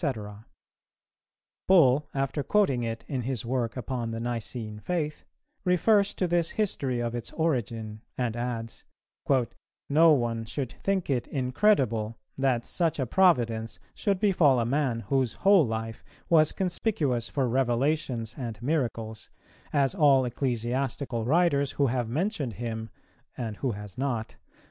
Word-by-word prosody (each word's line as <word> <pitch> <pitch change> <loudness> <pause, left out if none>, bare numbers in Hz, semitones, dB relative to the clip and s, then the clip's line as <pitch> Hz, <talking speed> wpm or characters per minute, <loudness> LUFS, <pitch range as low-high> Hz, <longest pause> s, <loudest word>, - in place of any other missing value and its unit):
[418:1] 110 - -4 1.2
Bull, 150 -6 +5
after 135 +2 -1
quoting 140 -6 +2
it 115 -1 -4
in 130 -3 -2
his 120 -2 -3
work 120 -1 -1
upon 125 -1 -3
the 115 0 -4
Nicene 115 -2 -4
Faith, 155 +2 -3 0.4
refers 200 +3 +3
to 185 - 0
this 170 -1 +1
history 140 - 0
of 120 -1 -2
its 120 -2 -5
origin, 115 -8 -2 0.2
and 120 -3 -1
adds, 120 -1 -4 1.1
"No 160 +3 +6
one 120 -5 +1
should 125 +2 -4
think 195 -2 0
it 125 -3 0
incredible 125 - +1 0.2
that 130 -4 +1
such 165 -3 0
a 135 - 0
providence 115 - +2 0.2
should 200 -4 0
befall 165 - +4
a 115 - +1
man 130 -2 0
whose 130 -2 0
whole 195 -8 +5
life 115 0 -4 0.3
was 155 -2 +5
conspicuous 170 - -1
for 135 -3 0
revelations 125 -1 0
and 115 -4 -5
miracles, 115 -5 -2 0.4
as 140 -2 +2
all 140 -7 +4
ecclesiastical 125 0 -2
writers 145 -1 +2
who 140 - +2
have 120 -3 -1
mentioned 150 - -1
him 110 +1 -5 0.5
(and 110 -4 -4
who 130 -4 -1
has 105 +3 -9
not?) 120 -5 -2
130 Hz, 135 wpm, -27 LUFS, 115-150 Hz, 1.2 s, No